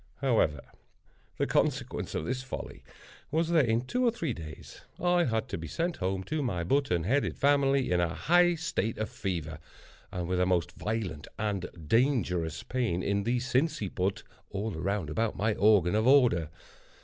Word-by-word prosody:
However, 110 - +1 0.8
the - - +1
consequence - - -1
of 80 - -2
this 130 +7 -2
folly 130 - -7 0.5
was, 160 +2 0
that 160 -7 +4
in 115 +1 +2
two 250 - -1
or 245 - +5
three 170 - -2
days, 80 -4 -10 0.2
I 175 0 +3
had 110 -2 -1
to - - -4
be 80 - -6
sent 170 - -2
home 95 0 -2
to 155 +8 -2
my 95 -11 -1
button 90 - +1
headed 135 - 0
family 140 -3 +3
in 90 - +3
a 85 0 0
high 175 +1 +4
state 155 -8 -2
of 110 - -3
fever, 80 -5 -4 0.5
and 90 -3 -3
with 90 0 0
a 90 - +3
most 90 -4 +1
violent 100 -9 -4
and 100 -4 -2 0.2
dangerous 90 - +1
pain 115 -9 -1
in 100 0 0
the 120 +2 +1
sinciput, 120 - -1 0.3
all 105 0 -3
around 90 -1 -2
about 110 +6 0
my 110 +1 +1
organ 100 -4 +4
of 110 +3 +2
order. 120 - +4
110 Hz, 170 wpm, -29 LUFS, 90-135 Hz, 0.8 s, or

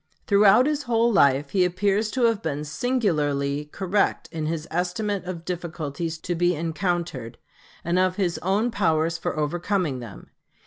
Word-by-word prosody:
Throughout 205 +4 +5
his 300 0 0
whole 230 0 +3
life 140 -4 +3
he 190 -2 +3
appears 200 +4 +1
to 255 +2 -1
have 230 -3 +3
been 150 -4 -3
singularly 150 - 0
correct 190 +6 -1
in 160 -2 -3
his 160 -1 -3
estimate 180 +4 -1
of 175 -2 -6
difficulties 165 -2 -4
to 175 - -2
be 175 +1 +2
encountered 165 - -3 0.5
and 170 +2 +1
of 185 0 +2
his 185 -4 -1
own 205 +6 +1
powers 165 -5 +1
for - - -3
overcoming 170 -1 -1
them. 115 -5 -11
175 Hz, 150 wpm, -24 LUFS, 155-200 Hz, 0.5 s, Throughout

